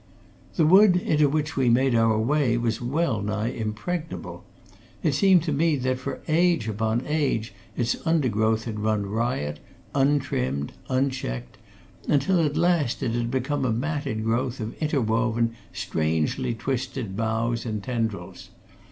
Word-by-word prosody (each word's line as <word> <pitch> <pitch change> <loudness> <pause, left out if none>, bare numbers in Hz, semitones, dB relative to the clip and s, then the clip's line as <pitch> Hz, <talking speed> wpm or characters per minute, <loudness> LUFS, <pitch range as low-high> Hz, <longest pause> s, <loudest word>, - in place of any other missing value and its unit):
The 160 - +3
wood 190 +3 +7
into 150 -4 +2
which 150 +2 -1
we 130 -3 +2
made 130 +2 +3
our 115 -1 +3
way 125 +1 +2
was 115 -1 -1
well 125 -3 0
nigh 105 +2 -1
impregnable; 140 +10 -4 0.6
it - - +2
seemed 190 -5 +5
to 165 - -2
me 155 +2 +2
that 130 -1 -1
for - - -5
age 165 -6 +2
upon 110 +3 -1
age 140 -8 -1 0.2
its 120 -1 +1
undergrowth 115 -9 +1
had 110 -3 -4
run 105 -1 0
riot, 100 - -2 0.3
untrimmed, 135 - 0 0.2
unchecked, 130 - -2 0.5
until 165 +5 +3
at 150 0 0
last 165 -7 +1
it 120 - 0
had 120 0 -1
become 135 +3 -1
a 125 - +1
matted 135 -2 -2
growth 125 +3 -1
of 110 0 -4
interwoven, 115 -5 +1 0.2
strangely 80 - -1
twisted 125 -3 -3
boughs 115 +2 -1
and 110 -3 -4
tendrils. 115 -4 -4
120 Hz, 140 wpm, -25 LUFS, 110-145 Hz, 0.6 s, wood